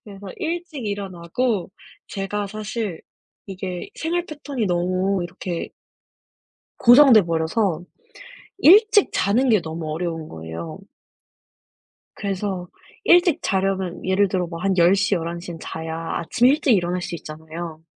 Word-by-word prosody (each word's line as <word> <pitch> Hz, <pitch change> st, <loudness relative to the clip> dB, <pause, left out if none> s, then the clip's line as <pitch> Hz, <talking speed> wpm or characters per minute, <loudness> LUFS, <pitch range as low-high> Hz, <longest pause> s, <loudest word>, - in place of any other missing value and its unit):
그래서 200 Hz, -2 st, -11 dB
일찍 330 Hz, -6 st, -4 dB
일어나고 195 Hz, +1 st, -2 dB, 0.4 s
제가 200 Hz, +1 st, -3 dB
사실 215 Hz, -3 st, -4 dB, 0.5 s
이게 185 Hz, -2 st, -6 dB
생활 345 Hz, +2 st, -2 dB
패턴이 285 Hz, -6 st, -4 dB
너무 185 Hz, +2 st, 0 dB
이렇게 175 Hz, 0 st, -5 dB, 1.1 s
고정돼 245 Hz, -2 st, +8 dB
버려서 170 Hz, +2 st, 0 dB, 0.8 s
일찍 410 Hz, +4 st, +6 dB
자는 235 Hz, +7 st, +2 dB
게 215 Hz, -4 st, +4 dB
너무 160 Hz, -1 st, -5 dB
어려운 165 Hz, -1 st, -4 dB
거예요. 80 Hz, 0 st, -7 dB, 1.4 s
그래서 195 Hz, -2 st, -3 dB, 0.4 s
일찍 345 Hz, -4 st, +5 dB
자려면 190 Hz, -2 st, -1 dB
예를 190 Hz, +2 st, +2 dB
들어 180 Hz, -1 st, -1 dB
뭐 165 Hz, -1 st, -7 dB
한 195 Hz, 0 st, 0 dB
10:00, 195 Hz, +4 st, +4 dB
11:00 170 Hz, 0 st, -4 dB
에는 165 Hz, -, -9 dB
자야 160 Hz, 0 st, -5 dB, 0.2 s
아침 225 Hz, +8 st, +1 dB
일찍 275 Hz, -2 st, +4 dB
일어날 180 Hz, -1 st, 0 dB
수 175 Hz, -, -5 dB
있잖아요. 160 Hz, +1 st, -8 dB
190 Hz, 245 characters per minute, -22 LUFS, 170-220 Hz, 1.4 s, 고정돼